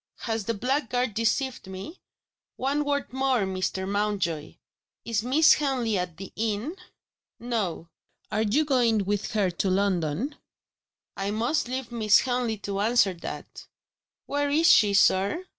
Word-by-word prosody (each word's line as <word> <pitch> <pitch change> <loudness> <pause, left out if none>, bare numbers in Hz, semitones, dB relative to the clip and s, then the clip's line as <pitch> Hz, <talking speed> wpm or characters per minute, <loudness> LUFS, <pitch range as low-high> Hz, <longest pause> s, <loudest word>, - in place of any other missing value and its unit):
"Has 225 -3 -2
the 230 - -1
blackguard 250 0 -1
deceived 230 +2 -1
me? 190 - -8 0.6
One 280 +3 0
word 285 -3 -2
more, 265 -3 +1
Mr. 190 0 -2
Mountjoy. 200 -6 -1 0.5
Is 230 -3 0
Miss 275 +7 +5
Henley 260 -7 0
at 180 -3 -3
the 195 0 -9
inn?" 225 - -2 0.6
"No." 215 -9 -3 0.4
"Are 215 - 0
you 230 +9 +2
going 235 -7 +2
with 205 +1 -2
her 200 -4 +1
to 180 +3 -1
London?" 190 - 0 0.8
"I 195 +1 -2
must 235 +8 0
leave 255 -1 -4
Miss 215 -3 +4
Henley 245 -3 -1
to 200 -1 -3
answer 210 -2 +3
that." 170 - -8 0.6
"Where 285 0 -1
is 320 +4 +5
she, 205 -2 +5
sir?" 200 - +3
220 Hz, 140 wpm, -26 LUFS, 195-260 Hz, 0.8 s, Miss